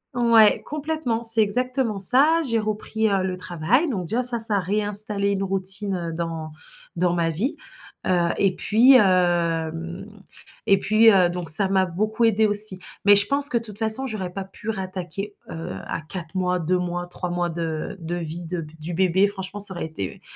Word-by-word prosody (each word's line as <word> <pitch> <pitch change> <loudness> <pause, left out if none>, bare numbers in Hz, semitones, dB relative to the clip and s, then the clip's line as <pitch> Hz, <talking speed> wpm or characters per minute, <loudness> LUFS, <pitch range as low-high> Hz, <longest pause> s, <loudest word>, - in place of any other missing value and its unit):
Ouais, 230 -3 +4
complètement, 300 -6 -3
c'est 225 -1 +6
exactement 245 0 -1
ça. 285 - +5
J'ai 230 - +1
repris, 215 0 -2
heu, 195 -1 0
le 185 -1 -3
travail, 185 - 0
donc 195 -10 -3
déjà 240 +7 -1
ça, 240 -1 0
ça 220 -2 -1
a - - +2
réinstallé 205 +1 0
une 195 -1 -1
routine, 195 +1 -3
heu, 170 -2 -5
dans 165 -1 -5 0.4
dans 175 0 0
ma 170 -1 0
vie, 200 - -3 0.5
heu 175 -2 +1
et 195 -2 +1
puis, 235 +6 +4
hem 170 -3 0 0.6
et 195 -1 +3
puis, 215 +3 +4
heu, 185 -3 +3
donc, 175 -3 -3
ça 190 +5 +7
m'a 190 -1 +2
beaucoup 215 +6 -1
aidé 220 -1 +2
aussi. 205 -2 +2 0.3
Mais 205 0 +7
je 205 0 +5
pense 285 +1 +5
que 240 - 0
de - - -11
toute 210 -3 -10
façon 220 +4 +2
j'aurais 200 -6 -5
pas 195 0 -6
pu 205 +3 -10
rattaquer, 190 0 -6 0.2
heu, 165 +2 -7
à - - -5
4 165 +1 -9
mois, 180 -1 -1
2 180 +2 -1
mois, 175 0 -4
3 180 0 -6
mois 175 0 -2
de 165 0 -5
de 165 +1 -5
vie 170 0 -6
de 175 -1 -4 0.2
du 165 +2 -6
bébé. 190 +2 +2
Franchement 195 0 -6
ça 195 -2 +3
aurait 170 - -4
été 100 -13 -7
195 Hz, 190 wpm, -22 LUFS, 175-220 Hz, 0.6 s, ça